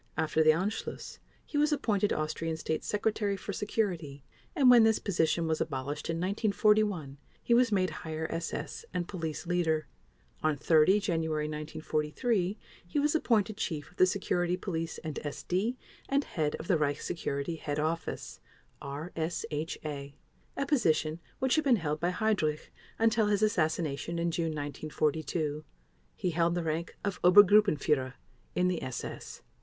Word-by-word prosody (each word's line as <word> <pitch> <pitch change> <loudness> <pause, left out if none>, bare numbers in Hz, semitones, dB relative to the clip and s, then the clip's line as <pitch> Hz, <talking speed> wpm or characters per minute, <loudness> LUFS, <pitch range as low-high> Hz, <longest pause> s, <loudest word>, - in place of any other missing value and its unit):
After 160 0 +1
the 155 - +5
Anschluss 185 +8 -1 0.3
he 290 - -2
was 300 +1 +3
appointed 210 -8 +1
Austrian 160 +1 -2
State 160 0 -2
Secretary 210 -1 0
for 200 +2 -5
Security 175 -10 -2 0.3
and 280 -6 +4
when 245 -2 +9
this 220 -1 +5
position 170 -3 +1
was 160 -1 0
abolished 140 0 -3
in 165 - 0
1941 200 -5 +1 0.2
he 235 - +2
was 240 -1 +4
made 185 -2 +2
Higher 160 0 -4
SS 165 - -4
and 175 -1 -1
Police 160 -5 -4
Leader. 165 -3 +1 0.6
On 155 -2 +1
30 160 +6 +5
January 160 -5 0
1943 155 - -1 0.3
he 175 - -3
was 295 +1 +2
appointed 220 -9 +2
Chief 150 -2 -3
of 180 - -25
the 185 - +6
Security 180 -2 0
Police 165 -4 -3
and 155 -3 -4
SD 185 - -2 0.3
and 280 +1 +2
Head 150 - -1
of 160 - -8
the 180 -5 +3
Reich 145 -1 0
Security 165 -1 -3
Head 145 -2 -3
Office 160 +2 -3 0.4
(RSHA), 150 -1 -4 0.4
a 275 - 0
position 165 - +1 0.2
which 265 -1 +1
had 310 - +3
been 270 -4 +5
held 155 -6 -2
by 175 - +1
Heydrich 180 -7 0 0.3
until 225 -1 +3
his 205 0 +2
assassination 165 -4 0
in 170 0 0
June 165 0 -1
1942. 155 +1 -2 0.5
He 180 - -1
held 170 +1 +2
the 175 - -1
rank 160 +1 -3
of 200 -2 -3
Obergruppenführer 180 - +5 0.4
in 180 0 +3
the 180 -2 -1
SS. 130 - -6
170 Hz, 150 wpm, -30 LUFS, 155-205 Hz, 0.6 s, when